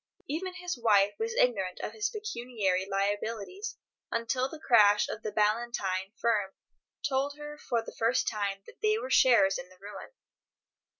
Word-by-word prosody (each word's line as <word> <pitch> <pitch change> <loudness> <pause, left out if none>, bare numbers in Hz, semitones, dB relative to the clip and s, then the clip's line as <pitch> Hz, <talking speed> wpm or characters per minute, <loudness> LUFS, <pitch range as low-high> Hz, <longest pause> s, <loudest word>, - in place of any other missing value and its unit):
Even 365 +5 -3
his 360 -5 -4
wife 205 -3 +4
was 455 +1 -2
ignorant 195 - +1
of - - -4
his 215 -1 -1
pecuniary 235 - -2
liabilities 205 - -2 0.3
until 250 +3 -1
the 315 - -8
crash 210 -8 +5
of 215 - -5
the 215 - -4
Ballantyne 210 -3 0
firm 210 -5 +1 0.5
told 280 +1 -1
her 295 0 -8
for 230 -2 -1
the - - -9
first 235 +3 +1
time 200 -2 -2
that - - -16
they 430 0 +3
were - - -5
sharers 215 -7 +5
in 180 - -9
the 185 - -19
ruin. 205 +2 -9
230 Hz, 160 wpm, -30 LUFS, 200-280 Hz, 0.5 s, crash